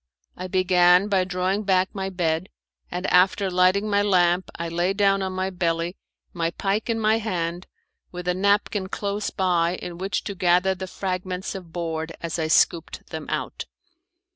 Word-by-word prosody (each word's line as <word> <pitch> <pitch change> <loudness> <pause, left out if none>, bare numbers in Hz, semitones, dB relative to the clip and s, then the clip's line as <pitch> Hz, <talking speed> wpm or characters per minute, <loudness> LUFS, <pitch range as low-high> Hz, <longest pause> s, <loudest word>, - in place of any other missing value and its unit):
I 185 - -6
began 180 +1 +4
by 190 -2 +2
drawing 185 +2 -1
back 190 -2 +1
my 195 -1 -3
bed, 170 -1 -1 0.4
and 180 +2 -4
after 190 +2 +4
lighting 185 +3 +3
my 205 -1 +2
lamp 180 -2 +2
I 170 - -4
lay 175 +3 0
down 195 -1 +2
on 190 0 -2
my 185 +1 -2
belly, 170 0 -1 0.4
my 165 -1 0
pike 200 +6 -2
in 225 -1 0
my 220 +1 +3
hand, 175 -4 -3 0.4
with 180 0 -7
a 180 - +2
napkin 200 0 +1
close 205 +1 -2
by 175 -2 +1
in 175 -1 -7
which 190 0 -2
to 200 - -4
gather 180 +1 +3
the 190 0 -6
fragments 185 0 -4
of 185 -4 -9
board 165 -1 -3
as 170 0 -4
I 160 - 0
scooped 165 +1 +1
them - - -6
out. - - -3
185 Hz, 170 wpm, -24 LUFS, 175-195 Hz, 0.4 s, began